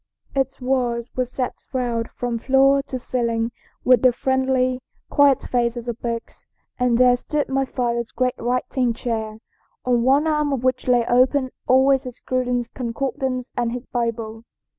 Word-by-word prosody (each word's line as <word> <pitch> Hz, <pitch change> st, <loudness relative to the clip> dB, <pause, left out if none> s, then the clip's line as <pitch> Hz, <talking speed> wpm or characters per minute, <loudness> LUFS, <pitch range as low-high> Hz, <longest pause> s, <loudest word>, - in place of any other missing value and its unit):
Its 270 Hz, 0 st, -1 dB
walls 250 Hz, -2 st, -1 dB
were 255 Hz, -, +1 dB
set 250 Hz, +1 st, -3 dB, 0.2 s
round 240 Hz, -3 st, -1 dB
from 240 Hz, -2 st, -3 dB
floor 270 Hz, +2 st, +4 dB
to 275 Hz, -2 st, -5 dB
ceiling 235 Hz, -2 st, -1 dB, 0.3 s
with 250 Hz, -3 st, +5 dB
the 255 Hz, -, +6 dB
friendly, 260 Hz, 0 st, 0 dB, 0.3 s
quiet 285 Hz, -2 st, +4 dB
faces 240 Hz, -1 st, -1 dB
of 235 Hz, -1 st, -4 dB
books, 230 Hz, -1 st, -5 dB, 0.3 s
and 250 Hz, -2 st, +3 dB
there 250 Hz, 0 st, +6 dB
stood 295 Hz, +4 st, -2 dB
my 270 Hz, 0 st, +1 dB
father's 235 Hz, -2 st, -2 dB
great 255 Hz, 0 st, 0 dB
writing 250 Hz, 0 st, 0 dB
chair, 220 Hz, -2 st, -3 dB, 0.5 s
on 245 Hz, -2 st, +2 dB
one 270 Hz, +5 st, +3 dB
arm 300 Hz, -2 st, +1 dB
of 265 Hz, -3 st, -2 dB
which 255 Hz, 0 st, 0 dB
lay 245 Hz, -2 st, +3 dB
open 255 Hz, +2 st, +3 dB, 0.2 s
always 265 Hz, +1 st, +5 dB
his 250 Hz, -2 st, -9 dB
Cruden's 250 Hz, -2 st, -1 dB
Concordance 255 Hz, +1 st, -3 dB
and 235 Hz, -1 st, -1 dB
his 250 Hz, +1 st, -6 dB
Bible. 230 Hz, -2 st, -3 dB
250 Hz, 155 wpm, -22 LUFS, 235-260 Hz, 0.5 s, the